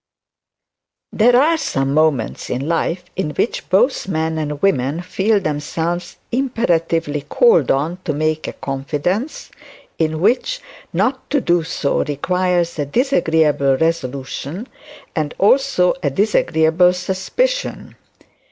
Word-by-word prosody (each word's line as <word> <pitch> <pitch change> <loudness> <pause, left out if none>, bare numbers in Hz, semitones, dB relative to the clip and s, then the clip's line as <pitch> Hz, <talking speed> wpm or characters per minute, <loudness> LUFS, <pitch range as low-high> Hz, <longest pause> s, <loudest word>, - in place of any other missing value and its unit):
There 245 +3 +4
are 320 +4 +3
some 135 - -1
moments 150 -6 +1
in 130 +4 -2
life 170 +2 -1
in 150 -6 -3
which - - -2
both 205 +4 +2
men 160 -3 -1
and 150 -1 -3
women 145 -3 +1
feel 200 +4 +1
themselves 165 +2 -3 1.1
called 485 0 +4
on 155 +7 0
to 165 - 0
make 155 +1 -1
a - - -5
confidence; 150 - -3 0.5
in 160 -1 0
which 250 - +1 0.3
not 225 +10 -1
to 285 - +2
do 175 -8 +2
so 155 -3 -1
requires 175 +3 -1
a 145 - 0
disagreeable 160 - +2
resolution 150 - -3 0.5
and 150 -2 -2
also 210 -4 +3
a 145 - +1
disagreeable 175 -1 +3
suspicion. 190 - -2
170 Hz, 115 wpm, -19 LUFS, 150-200 Hz, 1.1 s, There